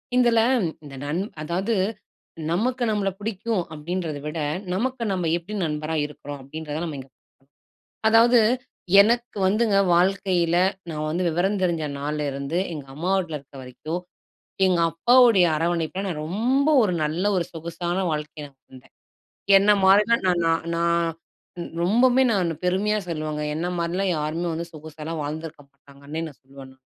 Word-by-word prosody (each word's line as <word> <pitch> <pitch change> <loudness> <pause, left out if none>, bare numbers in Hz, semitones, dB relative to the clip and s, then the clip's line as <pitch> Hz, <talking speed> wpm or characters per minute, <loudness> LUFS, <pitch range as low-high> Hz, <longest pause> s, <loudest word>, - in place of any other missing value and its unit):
இதில 240 -2 +4 0.4
இந்த 140 -2 -10
நன் 160 +6 -1 0.2
அதாவது 190 +8 -1 0.8
நமக்கு 245 +7 0
நம்மள 200 -2 0
புடிக்கும் 215 -2 -2
அப்டின்றத 160 -1 -4
விட, 155 +2 -4 0.3
நமக்கு 250 +4 -1
நம்ம 180 -3 -1
எப்டி 185 +5 -9
நண்பரா 155 +1 -3
இருக்றோம்? 145 -1 -8
அப்டின்றத 155 +2 -6
நம்ம 150 -4 -5
இங்க 135 0 -11 1.0
அதாவது 235 +2 +6 0.6
எனக்கு 235 +2 +2
வந்துங்க 210 +1 +2 0.2
வாழ்க்கையில, 180 -2 +2 0.3
நான் 155 0 -3
வந்து 175 +3 -1
விவரம் 190 +4 0
தெரிஞ்ச 170 -3 0 0.2
நாள்லருந்து, 145 +1 -2
எங்க 145 -3 -7
அம்மா 175 +6 -2
வீட்ல 165 -5 -3
இருக்கிற 140 0 -15
வரைக்கும் 135 +8 -5 0.7
எங்க 180 -2 +2
அப்பாவுடைய 235 0 +5
அரவணைப்பில 170 +3 -1
நான் 155 -5 -3
ரொம்ப 255 - +1
ஒரு 190 -4 +1
நல்ல 160 +6 -1
ஒரு 175 - +1
சொகுசான 170 +2 -4
வாழ்க்கையா 150 0 -4
நான் 135 -1 -27
இருந்தேன். 130 0 -16 0.7
என்னை 205 +2 +5
மாரிலாம் 210 +4 +4
நான் 175 -1 +2
நான் 165 0 +1
நான் 170 -1 +1 0.7
ரொம்பமே 245 +7 +4
நான் 185 -5 +1
பெருமையா 200 +4 +1
சொல்லுவங்க 155 -2 -3
என்னை 175 +3 -2
மாரிலாம் 180 +3 0
யாருமே 155 +3 -2
வந்து 170 +1 -4
சொகுசாகலாம் 155 +1 -7
வாழ்ந்துருக்க 155 +1 -6
மாட்டாங்கன்னே 140 +3 -9
நான் 145 - -13
சொல்லுவேன் 135 0 -13
நானு. 130 - -23
170 Hz, 140 wpm, -24 LUFS, 150-195 Hz, 1.0 s, அதாவது